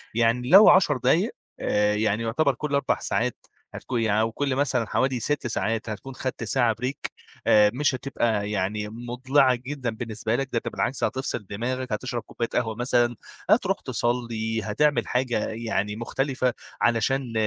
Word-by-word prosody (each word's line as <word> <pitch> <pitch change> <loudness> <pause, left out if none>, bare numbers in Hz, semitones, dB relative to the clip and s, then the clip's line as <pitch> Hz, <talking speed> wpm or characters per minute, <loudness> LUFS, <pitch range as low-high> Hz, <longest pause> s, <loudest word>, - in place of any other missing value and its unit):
يعني 120 +2 +2
لو 195 +5 +9
10 155 -7 +5
دقايق 165 - +2 0.3
آآ، 105 0 +1
يعني 110 +1 0
يُعتبَر 130 +4 +1
كل 150 +1 -4
4 140 -1 +1
ساعات 120 +1 -2 0.3
هتكُو 125 - -4
يعني 110 -2 +2
أو 115 0 0
كل 135 +2 -1
مثلًا 130 -4 +1
حوالي 130 0 0
6 145 +1 -1
ساعات 115 0 -2
هتكُون 125 +5 -7
خَدْت 130 -3 -4
ساعة 115 0 +1
break 130 +2 -3 0.4
آآ 105 -1 +6
مش 145 0 +1
هتبقى 115 -6 -1
يعني 105 +1 -2
مُضلِعة 125 +3 +1
جدًا 130 0 -4
بالنسبة 110 0 -3
لك، 135 0 -2
ده 115 - +1
ده - - -1
بالعكس، 135 - -2
هتفصِل 130 -5 -2
دماغك، 125 +4 -3
هتشرَب 120 +1 -3
كوباية 115 +2 -4
قهوة 110 -2 0
مثلًا، 120 0 +1 0.3
هتروح - - +3
تصّلي، 115 -2 -2
هتعمِل 145 +8 +1
حاجة 125 -3 0
يعني 110 -2 -2
مختلِفة 130 +2 -1 0.3
علشان 120 +2 +1
120 Hz, 160 wpm, -25 LUFS, 110-130 Hz, 0.4 s, لو